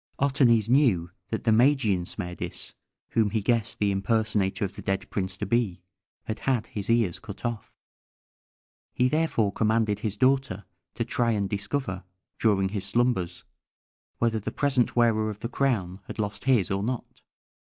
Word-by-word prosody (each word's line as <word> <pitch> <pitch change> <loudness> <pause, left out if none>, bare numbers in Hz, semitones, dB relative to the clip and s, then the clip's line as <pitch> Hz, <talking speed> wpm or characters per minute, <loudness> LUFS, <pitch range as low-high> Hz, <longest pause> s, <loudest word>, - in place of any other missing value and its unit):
Otanes 130 -6 +3
knew 115 - +3 0.2
that 110 - -3
the 115 - +3
Magian 110 -6 +3
Smerdis, 90 0 -6 0.4
whom 110 -2 +2
he 110 +2 0
guessed 115 0 0
the 105 -1 +1
impersonator 105 -1 0
of 95 - -7
the - - -8
dead 95 0 -2
prince 95 -1 -2
to 105 - -3
be, 100 -5 0 0.4
had 110 - -4
had 125 -4 0
his 100 -2 -6
ears 115 -7 +2
cut 105 +3 -9
off. 115 - -3 1.2
He 125 - +3
therefore 140 -9 +1
commanded 110 -1 +1
his 105 -2 -3
daughter 130 -6 +1 0.3
to - - -1
try 120 -1 +1
and 100 -2 0
discover, 100 -1 -3 0.4
during 95 -4 +2
his 100 -1 -3
slumbers, 95 -6 0 0.7
whether 115 -1 +1
the 105 - -4
present 135 -4 +1
wearer 110 -3 +3
of 105 0 -7
the - - -2
crown 110 -9 0
had - - -7
lost 105 -1 -3
his 120 -7 +3
or 95 0 0
not. 120 +3 -4
110 Hz, 160 wpm, -27 LUFS, 100-120 Hz, 1.2 s, Otanes